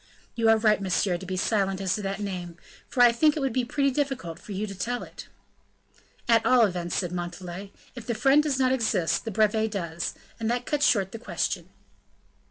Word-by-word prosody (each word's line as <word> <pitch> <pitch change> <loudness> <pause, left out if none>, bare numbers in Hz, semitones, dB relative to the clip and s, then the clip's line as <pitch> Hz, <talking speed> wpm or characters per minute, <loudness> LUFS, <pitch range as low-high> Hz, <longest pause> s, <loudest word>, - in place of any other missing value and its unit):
"You 230 -1 +2
are 225 - +6
right, 215 -2 +3
monsieur, 185 -1 +1
to 190 - -9
be 185 0 -3
silent 195 -1 0
as 190 -2 0
to 215 - -2
that 195 +1 -3
name; 180 -4 -5 0.3
for 245 - +3
I 240 - +8
think 300 +6 +3
it - - 0
would 270 -4 -1
be 255 - +1
pretty 275 +3 +1
difficult 255 - -3
for - - -11
you 200 +2 -2
to 200 - -7
tell 245 +5 -3
it." - - -11 1.0
"At 230 -1 +4
all 250 -3 +5
events," 175 -3 -3
said 180 -3 -1
Montalais, 180 +2 -6 0.2
"if 240 -3 -10
the 235 - -1
friend 275 +5 +4
does 295 -3 -1
not 260 -1 +2
exist, 215 -10 +1
the 225 - -3
brevet 220 +1 +2
does, 170 -5 -4 0.2
and 225 0 -1
that 245 +1 -1
cuts 295 -1 +2
short 195 -4 +2
the 225 - -7
question." - - -3
215 Hz, 210 wpm, -26 LUFS, 185-245 Hz, 1.0 s, I